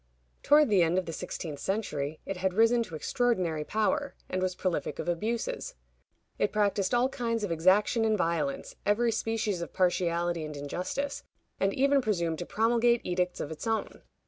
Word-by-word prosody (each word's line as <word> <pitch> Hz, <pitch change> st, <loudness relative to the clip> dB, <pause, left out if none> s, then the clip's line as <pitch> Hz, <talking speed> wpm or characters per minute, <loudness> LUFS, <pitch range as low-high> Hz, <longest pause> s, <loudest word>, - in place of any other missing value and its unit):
Toward 295 Hz, -2 st, +5 dB
the 200 Hz, -4 st, +4 dB
end 170 Hz, +2 st, +2 dB
of 185 Hz, -, 0 dB
the 165 Hz, -, -5 dB
sixteenth 160 Hz, -3 st, -5 dB
century 155 Hz, -7 st, -2 dB
it 195 Hz, -, -4 dB
had 185 Hz, 0 st, -1 dB
risen 230 Hz, +2 st, +4 dB
to 165 Hz, -, -8 dB
extraordinary 180 Hz, -5 st, 0 dB
power, 280 Hz, -, 0 dB
and 185 Hz, -, -1 dB
was 185 Hz, -1 st, -1 dB
prolific 185 Hz, -2 st, -2 dB
of -, -, -5 dB
abuses. 235 Hz, -, -2 dB, 0.6 s
It -, -, +2 dB
practiced 205 Hz, 0 st, +1 dB
all 245 Hz, +2 st, +4 dB
kinds 230 Hz, -4 st, -2 dB
of 200 Hz, -, -2 dB
exaction 190 Hz, +7 st, +3 dB
and 220 Hz, -1 st, +2 dB
violence, 160 Hz, -6 st, -1 dB
every 225 Hz, +4 st, +2 dB
species 220 Hz, -5 st, -1 dB
of 170 Hz, -, -6 dB
partiality 175 Hz, -2 st, +1 dB
and 150 Hz, -1 st, -6 dB
injustice, 180 Hz, -, -3 dB, 0.4 s
and 195 Hz, 0 st, +2 dB
even 275 Hz, +1 st, +3 dB
presumed 170 Hz, -8 st, -1 dB
to 175 Hz, -, -5 dB
promulgate 235 Hz, +1 st, +2 dB
edicts 180 Hz, 0 st, -1 dB
of 145 Hz, -, -4 dB
its 160 Hz, +8 st, -6 dB
own. 225 Hz, -1 st, -2 dB
195 Hz, 170 wpm, -29 LUFS, 170-230 Hz, 0.6 s, Toward